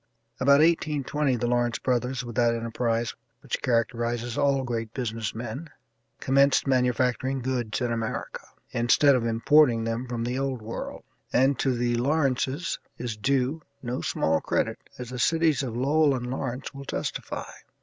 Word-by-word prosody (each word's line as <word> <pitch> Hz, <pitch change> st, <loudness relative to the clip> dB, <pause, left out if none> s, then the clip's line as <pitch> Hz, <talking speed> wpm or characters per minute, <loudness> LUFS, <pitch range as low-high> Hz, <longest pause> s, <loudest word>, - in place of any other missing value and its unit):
About 140 Hz, +3 st, +5 dB
1820 150 Hz, -4 st, +1 dB
the 120 Hz, -, -2 dB
Lawrence 120 Hz, -1 st, +1 dB
brothers, 125 Hz, 0 st, -1 dB
with 120 Hz, -2 st, -7 dB
that 120 Hz, -1 st, +3 dB
enterprise 115 Hz, 0 st, -1 dB, 0.3 s
which -, -, -4 dB
characterizes 120 Hz, 0 st, 0 dB
all 140 Hz, -2 st, +2 dB
great 115 Hz, -3 st, -4 dB
business 115 Hz, -5 st, -3 dB
men, 120 Hz, +8 st, -6 dB, 0.5 s
commenced 140 Hz, +1 st, +3 dB
manufacturing 130 Hz, 0 st, +1 dB
goods 125 Hz, -2 st, -2 dB
in 120 Hz, -1 st, 0 dB
America, 115 Hz, -1 st, -3 dB, 0.3 s
instead 120 Hz, +4 st, +4 dB
of 120 Hz, -3 st, +1 dB
importing 115 Hz, +1 st, +4 dB
them 115 Hz, +3 st, -2 dB
from 120 Hz, -1 st, -3 dB
the 125 Hz, +2 st, -2 dB
old 135 Hz, -4 st, -2 dB
world, 115 Hz, +2 st, -6 dB, 0.3 s
and 135 Hz, +2 st, +3 dB
to 130 Hz, -2 st, +1 dB
the 120 Hz, 0 st, +1 dB
Lawrences 140 Hz, +3 st, 0 dB, 0.2 s
is 120 Hz, -2 st, -4 dB
due 135 Hz, +6 st, 0 dB, 0.2 s
no 125 Hz, +1 st, -3 dB
small 80 Hz, 0 st, +1 dB
credit, -, -, -1 dB, 0.2 s
as 125 Hz, -1 st, -7 dB
the 125 Hz, -, -5 dB
cities 160 Hz, +1 st, +3 dB
of 120 Hz, -4 st, -4 dB
Lowell 145 Hz, +2 st, +3 dB
and 125 Hz, -1 st, -4 dB
Lawrence 130 Hz, 0 st, -4 dB
will 140 Hz, 0 st, -9 dB
testify. -, -, -4 dB
125 Hz, 150 wpm, -26 LUFS, 115-135 Hz, 0.5 s, About